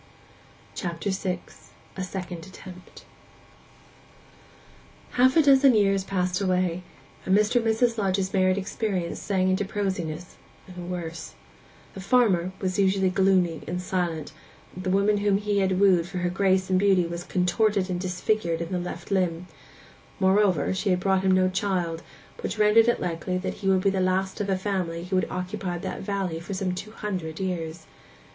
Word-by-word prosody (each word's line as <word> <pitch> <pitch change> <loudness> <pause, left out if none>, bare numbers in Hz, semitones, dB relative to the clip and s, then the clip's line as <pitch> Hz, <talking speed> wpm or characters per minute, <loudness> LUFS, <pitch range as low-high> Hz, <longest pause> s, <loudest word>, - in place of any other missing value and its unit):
CHAPTER 175 +2 -3
VI—A 190 0 -6
SECOND 180 -2 -6
ATTEMPT 185 -1 -13 2.1
Half 260 +4 +4
a 320 - +6
dozen 270 -2 +6
years 195 -2 +3
passed 185 -1 -1
away, 185 -2 0 0.4
and 190 +1 +3
Mr. 215 +3 +2
and 235 - +1
Mrs. 225 +1 +2
Lodge's 190 -1 0
married 185 -1 +3
experience 190 -3 -2
sank 185 -2 +1
into 190 +2 +1
prosiness, 185 -5 -4 0.3
and 180 -1 -8
worse. 165 -2 -6 0.6
The 195 - -8
farmer 195 -5 +2
was 185 0 -2
usually 190 -1 +2
gloomy 185 -3 +2
and 180 +1 -3
silent: 175 -5 -2 0.4
the 185 +1 -4
woman 200 +2 +3
whom 200 -1 +2
he 205 0 0
had 190 -1 +1
wooed 185 -4 +4
for 185 0 -6
her 175 0 -1
grace 190 0 +1
and 185 - +4
beauty 190 -3 +3
was 170 +1 -5
contorted 190 +2 +1
and 180 -2 -2
disfigured 180 -1 -1
in 170 +1 -5
the 180 - -1
left 175 +1 -7
limb; 180 -3 0 0.7
moreover, 190 -4 +3
she 195 +2 -1
had 180 -1 +2
brought 190 0 +2
him 190 - +1
no 185 0 +4
child, 185 -4 -1 0.4
which 445 - -4
rendered 215 +2 +5
it 240 - +2
likely 180 +1 -2
that 185 - -3
he 195 - -2
would 190 -1 +3
be 195 0 +2
the 190 -1 0
last 190 +2 0
of 200 - -2
a 190 - +1
family 185 -4 -2
who 185 +2 -3
had 185 - 0
occupied 180 -1 -4
that - - -4
valley 190 -4 -2
for 175 +4 -6
some 185 -1 -1
two 185 +4 -6
hundred 185 -7 -5
years. 165 -3 -4
185 Hz, 165 wpm, -26 LUFS, 180-200 Hz, 2.1 s, a